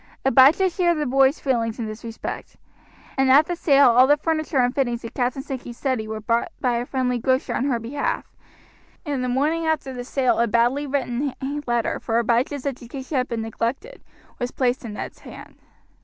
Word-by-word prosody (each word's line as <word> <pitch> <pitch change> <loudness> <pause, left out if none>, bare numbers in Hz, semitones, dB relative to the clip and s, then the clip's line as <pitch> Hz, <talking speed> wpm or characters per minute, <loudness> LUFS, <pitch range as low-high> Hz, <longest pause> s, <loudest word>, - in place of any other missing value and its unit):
Abijah 270 +8 +6
shared 345 -1 +1
the 300 - -1
boy's 270 +2 +3
feelings 230 -5 -1
in 235 - -3
this 215 +1 -7
respect, 225 -1 -7 0.6
and 270 0 +3
at 285 +4 +7
the 350 - -3
sale 280 -6 +5
all 250 +2 +6
the 290 +1 +5
furniture 310 -1 -1
and 245 -1 +3
fittings 240 -4 -1
of 230 - -7
Captain 255 +1 -1
Sankey's 250 -4 -7
study 255 -6 -1
were 220 0 -4
bought 230 +9 0
by 245 -3 +1
a 240 +1 -3
friendly 250 -2 -1
grocer 260 +3 0
on 260 - -1
her 265 -4 +1
behalf, 285 - -3 0.8
and 280 -4 -2
the 250 - -1
morning 310 +6 0
after 310 -4 -1
the 245 -1 -5
sale 255 -1 +1
a 235 - +3
badly 240 +6 +1
written 265 -1 -2 0.3
letter, 240 -1 0
for 225 -1 -1
Abijah's 240 +4 0
education 265 +1 -5
had 250 0 0
been 230 -2 -3
neglected, 240 - -4 0.4
was 245 -1 -2
placed 255 0 -1
in 225 -3 -6
Ned's - - -7
hand. - - -12
260 Hz, 190 wpm, -23 LUFS, 235-280 Hz, 0.8 s, at